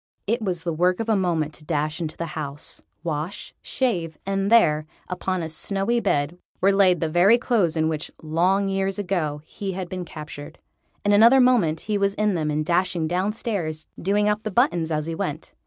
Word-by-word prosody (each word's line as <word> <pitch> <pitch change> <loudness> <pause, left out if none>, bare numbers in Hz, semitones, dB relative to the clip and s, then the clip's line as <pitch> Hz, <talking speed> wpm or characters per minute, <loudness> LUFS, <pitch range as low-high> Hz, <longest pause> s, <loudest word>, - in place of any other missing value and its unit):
It 230 +3 0
was 180 -5 -1
the 170 - -1
work 180 +3 +2
of 225 0 -2
a 220 - +4
moment 165 -5 0
to 155 - -13
dash 155 +1 -2
into 160 -2 -4
the 170 - -3
house, 145 -1 -4 0.2
wash, 160 +3 -4
shave, 175 - -1
and 195 +1 -1
there, 155 -10 +4 0.2
upon 185 -1 -2
a - - -3
snowy 195 +8 0
bed, 170 -5 0 0.2
were 195 - +4
laid 190 -3 +4
the 165 - +1
very 175 +8 +5
clothes 205 -10 +1
in 160 0 +2
which 160 -1 -3
long 180 +5 +1
years 195 0 -1
ago 175 -7 -1
he 195 +2 -5
had 185 -1 -5
been 185 -1 -4
captured. 150 -1 -9 0.5
In 205 - +3
another 230 +6 +7
moment 220 -12 +3
he 210 -1 -1
was 200 0 +1
in 210 -1 +1
them 155 -3 -1
and 150 +1 -1
dashing 175 -1 +1
downstairs, 180 -3 -2 0.2
doing 205 +3 +2
up 210 0 +1
the 215 - -3
buttons 180 - +2
as 155 -1 -1
he 165 - -3
went. 160 -3 -4
180 Hz, 195 wpm, -24 LUFS, 160-200 Hz, 0.5 s, another